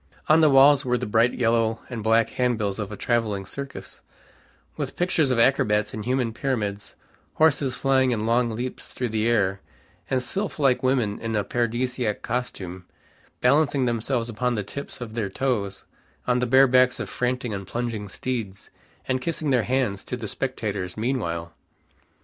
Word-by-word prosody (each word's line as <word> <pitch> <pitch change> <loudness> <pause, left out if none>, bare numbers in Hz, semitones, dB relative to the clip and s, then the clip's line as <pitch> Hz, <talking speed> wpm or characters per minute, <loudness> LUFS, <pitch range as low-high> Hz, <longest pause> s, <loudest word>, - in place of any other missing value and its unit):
On 155 +1 +6
the 155 - +6
walls 140 +1 +6
were 125 -1 +1
the - - -3
bright 115 +3 +2
yellow 115 -1 +1
and 120 -3 -5
black 115 +1 +3
handbills 110 -5 0
of 105 -1 -4
a 105 - -6
traveling 110 -5 0
circus, 140 +8 -7 0.7
with - - -4
pictures 175 -5 +2
of 125 - +1
acrobats 105 -4 +2
in 110 - -4
human 125 0 0
pyramids, 105 -6 -3 0.4
horses 145 -4 +3
flying 130 -1 +2
in 110 -3 -1
long 120 +1 +2
leaps 120 +3 -5
through 125 -2 -2
the 110 +1 0
air, 95 -5 +1 0.5
and 130 -1 0
sylph 195 - -3
like 135 -4 +3
women 125 -6 +1
in 115 -1 -3
a 105 - +1
paradisaic 120 0 -1
costume, 95 -7 -4 0.5
balancing 140 +1 +3
themselves 120 0 -1
upon 120 +1 -1
the 105 - -2
tips 140 +5 -7
of 115 -3 -6
their 110 -4 -2
toes 105 -4 -2 0.4
on 125 0 +2
the 125 - 0
bare 130 +3 +6
backs 130 -1 +3
of - - -3
frantic 125 -1 -2
and 100 -2 -5
plunging 115 -4 -3
steeds, 110 -4 -5 0.4
and 130 0 0
kissing 155 -2 -1
their 125 -3 +2
hands 125 -7 0
to 125 - -4
the 115 -3 -5
spectators 105 -8 -3
meanwhile. 85 -9 -2
120 Hz, 165 wpm, -24 LUFS, 105-130 Hz, 0.7 s, On